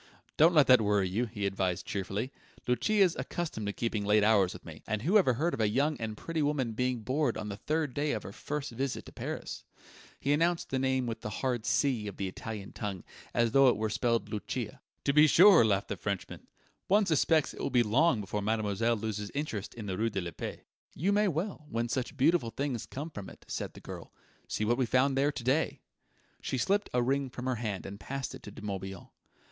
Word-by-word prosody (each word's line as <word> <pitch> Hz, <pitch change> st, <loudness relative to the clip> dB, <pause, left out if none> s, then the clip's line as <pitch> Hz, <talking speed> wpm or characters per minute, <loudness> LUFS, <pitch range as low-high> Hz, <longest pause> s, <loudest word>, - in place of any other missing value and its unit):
"Don't 165 Hz, +3 st, +5 dB
let 150 Hz, -3 st, +7 dB
that 125 Hz, -2 st, +7 dB
worry 105 Hz, -2 st, +2 dB
you," 105 Hz, +7 st, 0 dB
he 105 Hz, -2 st, -4 dB
advised 95 Hz, -2 st, -1 dB
cheerfully. 100 Hz, +6 st, -3 dB, 0.4 s
"Lucia's 185 Hz, -, +3 dB
accustomed 125 Hz, -4 st, -3 dB
to -, -, 0 dB
keeping 115 Hz, -2 st, -2 dB
late 105 Hz, +1 st, +4 dB
hours 100 Hz, -4 st, +4 dB
with -, -, -11 dB
me; -, -, -10 dB
and 110 Hz, 0 st, -2 dB
who 180 Hz, +9 st, +2 dB
ever 130 Hz, -10 st, +3 dB
heard 165 Hz, +8 st, 0 dB
of -, -, -2 dB
a 105 Hz, -, +3 dB
young 140 Hz, +7 st, +1 dB
and 110 Hz, -1 st, -4 dB
pretty 165 Hz, +5 st, -3 dB
woman 145 Hz, -5 st, 0 dB
being 125 Hz, +1 st, -1 dB
bored 130 Hz, +1 st, 0 dB
on 105 Hz, -1 st, -4 dB
the 100 Hz, -, -4 dB
third 155 Hz, +3 st, -1 dB
day 145 Hz, +2 st, 0 dB
of 110 Hz, -, -2 dB
her -, -, -7 dB
first 145 Hz, +6 st, -4 dB
visit 130 Hz, +3 st, -3 dB
to -, -, -11 dB
Paris?" -, -, -5 dB, 0.6 s
He 140 Hz, -, 0 dB
pronounced 165 Hz, +3 st, +1 dB
the 130 Hz, -, +1 dB
name 130 Hz, -1 st, +1 dB
with 115 Hz, -1 st, -4 dB
the -, -, -4 dB
hard 120 Hz, +1 st, -2 dB
C 125 Hz, -7 st, +1 dB
of 100 Hz, -, -7 dB
the 100 Hz, -, -2 dB
Italian 100 Hz, +1 st, -6 dB
tongue, 100 Hz, -4 st, -5 dB, 0.3 s
as 120 Hz, -1 st, +2 dB
though 135 Hz, +1 st, +6 dB
it 120 Hz, -, +1 dB
were 110 Hz, 0 st, -1 dB
spelled 115 Hz, -2 st, 0 dB
Luchia. 105 Hz, -2 st, -4 dB, 0.2 s
"To 140 Hz, -, +2 dB
be 150 Hz, +1 st, +7 dB
sure," 180 Hz, -, +8 dB
laughed 100 Hz, -3 st, +1 dB
the -, -, -3 dB
Frenchman; 100 Hz, -3 st, -4 dB, 0.4 s
"one 205 Hz, +2 st, +4 dB
suspects 160 Hz, -2 st, +2 dB
it -, -, -11 dB
will -, -, -1 dB
be 120 Hz, -1 st, +4 dB
long 125 Hz, +3 st, +3 dB
before 105 Hz, +1 st, -3 dB
mademoiselle 110 Hz, +2 st, +1 dB
loses 105 Hz, -1 st, -3 dB
interest 125 Hz, -9 st, -3 dB
in 115 Hz, -3 st, -7 dB
the 95 Hz, -2 st, -3 dB
rue 115 Hz, +1 st, +2 dB
de 100 Hz, -3 st, -2 dB
la 85 Hz, -1 st, -5 dB
Paix." -, -, -6 dB, 0.3 s
"You 185 Hz, +7 st, +1 dB
may 210 Hz, +1 st, +3 dB
well, 165 Hz, -2 st, -3 dB
when 115 Hz, +1 st, -1 dB
such 130 Hz, +3 st, -3 dB
beautiful 140 Hz, -3 st, +3 dB
things 135 Hz, -2 st, -3 dB
come 150 Hz, +5 st, -6 dB
from 100 Hz, -8 st, -7 dB
it," -, -, -15 dB
said -, -, -4 dB
the -, -, -10 dB
girl. -, -, -9 dB, 0.4 s
"See 105 Hz, -, -1 dB
what 120 Hz, +4 st, +1 dB
we 130 Hz, -, +2 dB
found 130 Hz, +3 st, +3 dB
there 140 Hz, +2 st, +2 dB
to 120 Hz, -, -7 dB
day." 135 Hz, +6 st, +1 dB, 0.6 s
She 130 Hz, -, -2 dB
slipped 200 Hz, +11 st, +1 dB
a 125 Hz, 0 st, +2 dB
ring 135 Hz, +1 st, 0 dB
from 125 Hz, 0 st, -7 dB
her 130 Hz, -2 st, 0 dB
hand 105 Hz, -4 st, -3 dB
and 100 Hz, +1 st, -7 dB
passed 135 Hz, +3 st, -4 dB
it -, -, -9 dB
to -, -, -9 dB
De 105 Hz, -, -11 dB
Morbihan. 95 Hz, -2 st, -5 dB
120 Hz, 225 wpm, -30 LUFS, 105-145 Hz, 0.6 s, sure